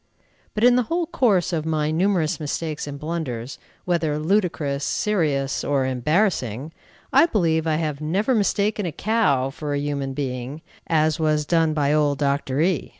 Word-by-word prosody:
But 215 - -1
in 245 0 +6
the - - +4
whole 340 +1 0
course 230 - +1
of 160 -2 0
my 155 -1 0
numerous 170 -2 +1
mistakes 155 0 -3
and 145 -1 -6
blunders, 140 -6 -4 0.3
whether 165 -4 0
ludicrous, 155 -5 0
serious, 150 -11 0
or 140 -2 +1
embarrassing, 130 - 0 0.4
I 335 - +6
believe 165 - +1
I 155 - +2
have 155 -2 -2
never 190 - 0
mistaken 205 -2 +1
a - - -3
cow 145 - +1
for 145 +1 -4
a - - 0
human 140 -2 -3
being, 130 +1 -4 0.2
as 155 -1 +2
was 155 -1 +1
done 165 -1 +2
by 145 -1 +2
old 145 -2 +2
Dr. 140 -1 0
E 175 -1 0
155 Hz, 160 wpm, -23 LUFS, 140-180 Hz, 0.4 s, in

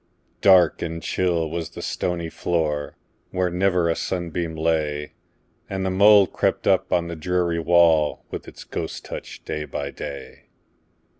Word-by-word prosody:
Dark 90 -4 +5
and 85 0 -3
chill 85 -3 0
was 80 0 -4
the - - -9
stony 85 -2 -2
floor, 80 -3 -2 0.3
Where 90 -1 -1
never 90 -1 +2
a 85 - +1
sunbeam 85 -2 -3
lay, 80 -2 -1 0.6
And 95 -1 -2
the 95 - 0
mould 100 0 +6
crept - - 0
up - - +2
on 85 -1 +1
the 85 - -5
dreary 85 +1 0
wall, 80 -2 +3
With - - -6
its - - -11
ghost - - -5
touch, - - -8
day 75 - -3
by 70 -1 -5
day. 70 0 -8
85 Hz, 150 wpm, -23 LUFS, 80-90 Hz, 0.6 s, mould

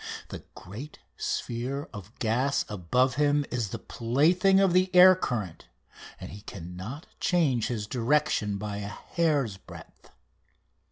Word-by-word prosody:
The - - -8
great 110 +11 -9 0.2
sphere 130 +5 -3
of 105 +1 -10
gas 125 +5 0
above 125 +7 0
him 145 0 +2
is 120 -5 -2
the 115 - -4
plaything 165 - +2
of 195 -3 +3
the 185 +1 +3
air 185 +1 +9
current, 110 - -4 0.5
and - - -8
he 100 - -10
cannot 95 - -8
change 145 -10 +1
his 110 -4 -3
direction 120 -3 0
by 105 0 -5
a 100 -1 -5
hair's 140 - -1
breadth. - - -14
125 Hz, 130 wpm, -27 LUFS, 105-150 Hz, 0.5 s, air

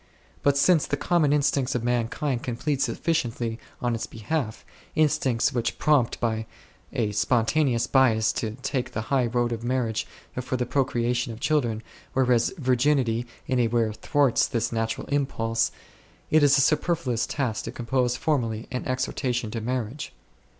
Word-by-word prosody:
But 140 0 +3
since 160 +2 +4
the 145 - -1
common 160 -2 +2
instincts 140 -3 +1
of 120 - -1
mankind 120 +2 -1
can 120 - -3
plead 140 +2 -1
sufficiently 120 -8 -1 0.2
on 120 -1 +1
its 115 - -3
behalf, 115 +1 -3 0.3
instincts 145 -4 +2
which 120 -2 -1
prompt 145 -6 +2
by 110 -2 -1 0.4
a 110 -3 0
spontaneous 120 +3 +2
bias 115 -5 +3
to 110 0 -3
take 130 -2 -2
the 110 - -2
high 130 -3 +3
road 120 0 0
of 115 -1 -4
marriage 120 -3 -1 0.3
for 130 +1 -2
the 125 - -1
pro 135 +2 +1
creation 120 0 -1
of 110 - -8
children, 120 -7 0 0.3
whereas 125 -3 +3
Virginity 125 -3 +1 0.2
in 130 -1 0
a 120 - +3
way 115 -1 +1
thwarts 140 +2 +2
this 115 - -1
natural 115 -1 -2
impulse, 115 -5 0 0.6
it 155 - +5
is 145 -1 +5
a - - +5
superfluous 150 -5 +1
task 125 -7 -2
to - - -4
compose 125 +1 0
formally 115 -7 -1
an 125 - -3
Exhortation 125 -2 -1
to 115 - -3
marriage. 125 +3 -3
125 Hz, 155 wpm, -26 LUFS, 115-140 Hz, 0.6 s, it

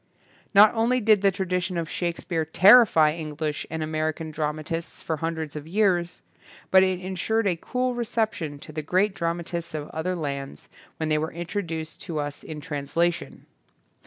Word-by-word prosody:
Not 205 +2 +8
only 235 +2 +2
did 215 -3 +4
the 200 - +5
tradition 180 -1 -2
of 165 -1 -2
Shake 170 0 -2
speare 165 -3 -2
terrify 180 -1 +6
English 155 -1 -4
and 160 0 -3
American 155 0 -2
dramatists 155 +2 -4
for 160 - -2
hundreds 160 -1 -4
of 150 0 -7
years, 180 -2 +1 0.5
but 190 - +8
it 185 -1 +1
insured 190 +4 -1
a 185 -3 +2
cool 250 +8 -2
reception 220 -10 -2
to - - -10
the 155 0 -4
great 185 +6 +1
dramatists 170 -1 -3
of 150 -1 -5
other 180 +4 -2
lands 140 -4 -5 0.3
when 160 -1 -2
they 155 0 +2
were 160 +1 -3
introduced 165 -2 -5
to 170 -5 -5
us 145 -1 -4
in 155 -1 -8
translation. 165 +2 -2
170 Hz, 160 wpm, -25 LUFS, 155-190 Hz, 0.5 s, Not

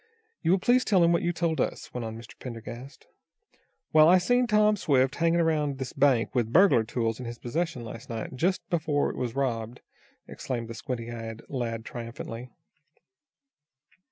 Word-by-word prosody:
"You - - 0
will 185 - +5
please 245 +6 +3
tell 190 -5 +3
him 170 - +4
what 170 - +2
you 175 - +1
told 160 -4 0
us," - - -3
went 125 - -4
on 110 0 -6
Mr. 115 -1 -11
Pendergast. 120 +2 -9 0.9
"Well, 155 +1 +7
I 185 - +7
seen 245 +7 +2
Tom 210 -1 +4
Swift 135 -8 +2
hanging 170 0 +2
around 150 -4 +1
this 130 -1 -5
bank 135 -5 +2
with 120 -4 0
burglar 175 - +5
tools 115 0 -2
in 125 - -6
his 120 0 -6
possession 155 +1 -3
last 115 0 -9
night, 115 +2 -5
just 180 +8 0
before 155 -4 +1
it - - -10
was 125 -1 -3
robbed," 120 -3 -2 0.5
exclaimed 120 -3 -5
the - - -5
squint 120 +1 -4
eyed 115 -1 -7
lad 115 -4 -3
triumphantly. 115 0 -7
130 Hz, 175 wpm, -27 LUFS, 115-170 Hz, 0.9 s, Well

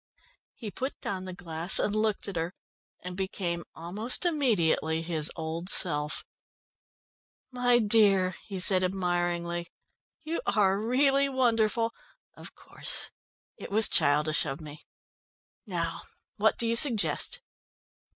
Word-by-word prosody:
He 215 -4 -8
put 265 +6 -5
down 185 -1 -4
the 185 - -6
glass, 170 0 +2
and 210 - 0
looked 215 -1 -1
at 200 - -6
her, 165 +3 -4 0.5
and 180 0 -7
became 180 -3 -3
almost 210 - -1
immediately 175 - +1
his 160 -2 -1
old 165 +2 -5
self. 150 -6 +2 1.3
"My 245 -1 +2
dear," 205 -4 +3 0.2
he 195 -3 -5
said 185 0 +5
admiringly, 175 -2 -2 0.6
"you 325 +2 -4
are 195 -2 +2
really 275 +4 +2
wonderful. 230 -3 +1 0.4
Of - - -12
course, - - -3 0.5
it - - -9
was 215 +2 +6
childish 150 +2 +3
of 135 0 -5
me. 150 -1 -11 0.8
Now - - -3 0.4
what - - +2
do 235 - +3
you 230 0 0
suggest?" 235 -5 +2
190 Hz, 120 wpm, -27 LUFS, 170-230 Hz, 1.3 s, was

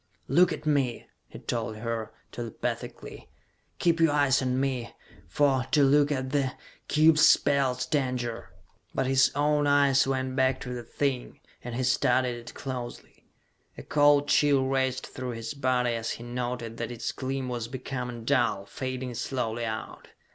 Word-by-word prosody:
"Look 175 +6 +4
at 155 - -5
me!" 140 -5 0 0.2
he - - -11
told 115 -2 -3
her, 115 0 -4 0.2
telepathically. 115 -2 -6 0.5
"Keep 170 -1 +2
your 165 -2 +4
eyes 140 -2 +3
on 130 0 0
me, 130 -3 -2 0.4
for 140 -3 +2
to 150 -2 +4
look 145 +1 +4
at 130 -2 -2
the 135 -3 0 0.3
cube 155 +1 +5
spells 140 -4 +4
danger!" 125 -5 -2 0.5
But 135 - +1
his 130 0 +4
own 145 0 +2
eyes 140 -2 +4
went 130 -1 -1
back 130 -1 +2
to 125 - -5
the 120 - -5
thing, 125 +1 -3 0.2
and 120 -1 -5
he 130 - -1
studied 125 -1 +2
it 120 0 -11
closely. 125 -3 -7 0.5
A - - -8
cold 145 0 +4
chill 140 -3 +3
raced 130 -1 0
through 130 -1 -6
his 115 +4 -5
body 125 -3 +1
as 115 -1 -3
he 115 - -9
noted 120 -1 -4
that 115 - -3
its 120 -1 -3
gleam 130 0 -3
was 120 -2 -3
becoming 125 -2 -5
dull, 120 -7 +1
fading 130 +1 -5
slowly 120 -1 -2
out. 110 0 -6
130 Hz, 155 wpm, -27 LUFS, 120-140 Hz, 0.5 s, cube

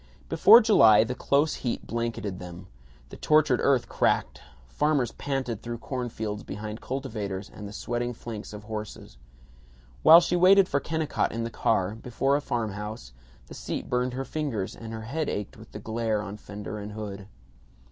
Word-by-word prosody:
Before 210 +8 +8
July 110 - +6
the 120 +3 -3
close 140 +4 +1
heat 120 - -3
blanketed 115 -5 -3
them. 90 0 -9 0.4
The - - -10
tortured 150 -4 +3
earth 135 -3 +2
cracked. - - 0 0.3
Farmers 135 - +1
panted 130 -6 -3
through 120 0 -5
corn 125 +1 -4
fields 105 -2 -4
behind 105 +2 -7
cultivators 105 -8 -5
and 105 - -8
the - - -9
sweating 120 +3 -3
flanks 110 -2 -7
of 105 0 -9
horses. 105 - -7 0.8
While 165 - +10
she 175 +1 0
waited 185 +2 +6
for 140 - +1
Kennicott 160 +1 -1
in 115 0 -3
the 115 - -4
car, 100 -4 +1
before 125 +4 -1
a 145 - 0
farmhouse, 105 - -4 0.3
the - - -12
seat - - -5
burned 125 0 0
her 135 +1 -3
fingers 135 -12 -3
and 115 -1 -9
her 110 -1 -6
head 150 +7 -2
ached 105 -1 -4
with - - -14
the - - -7
glare 110 -1 -2
on 100 -1 -6
fenders 105 +1 -7
and 105 +1 -7
hood. 100 -2 -7
115 Hz, 170 wpm, -27 LUFS, 105-135 Hz, 0.8 s, While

